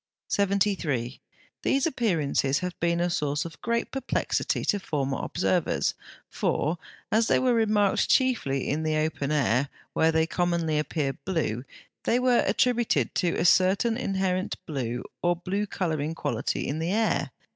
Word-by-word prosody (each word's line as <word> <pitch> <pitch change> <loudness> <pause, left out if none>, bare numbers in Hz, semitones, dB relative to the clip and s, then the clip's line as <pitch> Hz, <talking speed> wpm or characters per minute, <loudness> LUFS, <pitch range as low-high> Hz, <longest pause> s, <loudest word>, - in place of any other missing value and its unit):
73. 190 - 0 0.4
These 270 0 +2
appearances 165 - +1
have 180 +1 -3
been 170 0 +1
a 175 - +2
source 150 -3 -1
of 165 - -9
great 235 +1 -1
perplexity 270 - -1
to 205 - +1
former 140 -7 -2
observers: 180 -1 0 0.3
for, 160 +3 -1 0.3
as 225 +1 +3
they - - +4
were 255 -1 +2
remarked 210 -3 +2
chiefly 225 - +2
in 150 +3 0
the 155 -1 0
open 155 -2 -1
air, 135 -2 +2 0.2
where 160 0 +3
they 160 0 +2
commonly 170 -3 0
appeared 140 -2 -2
blue, 145 - -1 0.4
they 235 - +2
were 250 -1 +3
attributed 240 -2 +2
to 175 -3 +1
a 170 - 0
certain 190 +6 +4
inherent 190 -5 -1
blue 125 -5 -3 0.2
or 175 0 +2
blue 195 +4 -2
colouring 160 -5 -2
quality 120 -7 -2
in 150 +3 -2
the 165 +2 -1
air. 220 +2 +1
170 Hz, 145 wpm, -27 LUFS, 150-205 Hz, 0.4 s, they